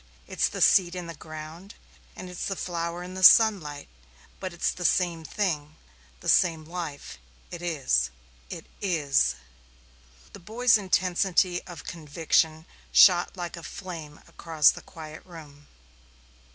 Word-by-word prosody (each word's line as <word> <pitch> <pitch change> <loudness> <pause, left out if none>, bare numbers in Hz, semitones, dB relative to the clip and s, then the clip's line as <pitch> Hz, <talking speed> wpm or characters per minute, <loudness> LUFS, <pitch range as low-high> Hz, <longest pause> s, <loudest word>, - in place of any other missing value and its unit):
It's - - 0
the - - -6
seed 180 -2 +4
in 180 -1 -5
the 170 - -7
ground, 155 +4 -10 0.4
and 185 - -9
it's 180 -1 -5
the 195 - -3
flower 170 -1 -4
in 180 +1 -9
the 185 - -6
sunlight, 185 -9 +5 0.5
but 185 -1 -5
it's 175 - -1
the 180 - -7
same 170 -1 +1
thing 155 -5 -3 0.5
the - - -9
same 165 -3 +3
life 165 - -7 0.3
it 175 - -7
is 135 - 0 0.4
it - - -8 0.2
is." 145 - +1 1.0
The 200 - -10
boy's 230 +6 +2
intensity 185 -2 +1
of 175 -2 -10
conviction 160 0 -1 0.3
shot 180 0 +5
like 175 0 -5
a 170 - -10
flame 165 -5 -9
across 160 -3 +3
the - - -10
quiet 155 -1 -11
room. 150 -5 -14
170 Hz, 140 wpm, -26 LUFS, 155-185 Hz, 1.0 s, sunlight